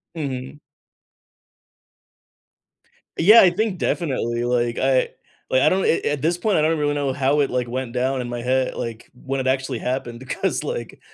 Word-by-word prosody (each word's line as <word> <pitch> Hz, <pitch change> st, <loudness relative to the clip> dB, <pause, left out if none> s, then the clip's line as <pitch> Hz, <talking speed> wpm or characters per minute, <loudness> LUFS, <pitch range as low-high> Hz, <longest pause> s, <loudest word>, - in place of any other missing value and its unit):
Mhm. 135 Hz, -2 st, -5 dB, 2.6 s
Yeah, 210 Hz, +7 st, +8 dB
I 185 Hz, -, +7 dB
think 195 Hz, +1 st, -1 dB
definitely. 125 Hz, -10 st, -1 dB
Like, 120 Hz, -1 st, 0 dB
I 130 Hz, -1 st, +2 dB, 0.4 s
like, 130 Hz, 0 st, +3 dB
I -, -, +5 dB
don't 190 Hz, +1 st, +1 dB
a -, -, +2 dB
at 145 Hz, -2 st, -2 dB
this 170 Hz, +3 st, +1 dB
point, 210 Hz, +2 st, +1 dB
I 155 Hz, -, +3 dB
don't 160 Hz, +1 st, +2 dB
really 145 Hz, -1 st, 0 dB
know 140 Hz, -2 st, -1 dB
how 140 Hz, +2 st, +1 dB
it, 140 Hz, -, +1 dB
like, 125 Hz, -1 st, -1 dB
went 125 Hz, 0 st, -4 dB
down 130 Hz, +1 st, 0 dB
in 120 Hz, -, -5 dB
my 120 Hz, 0 st, -4 dB
head 130 Hz, +1 st, 0 dB
like, 115 Hz, -1 st, -6 dB
when 135 Hz, +2 st, -4 dB
it 130 Hz, -, -2 dB
actually 130 Hz, -2 st, -1 dB
happened 125 Hz, -2 st, -3 dB
because, 130 Hz, -, -2 dB
like, -, -, -5 dB
130 Hz, 180 wpm, -22 LUFS, 125-150 Hz, 2.6 s, Yeah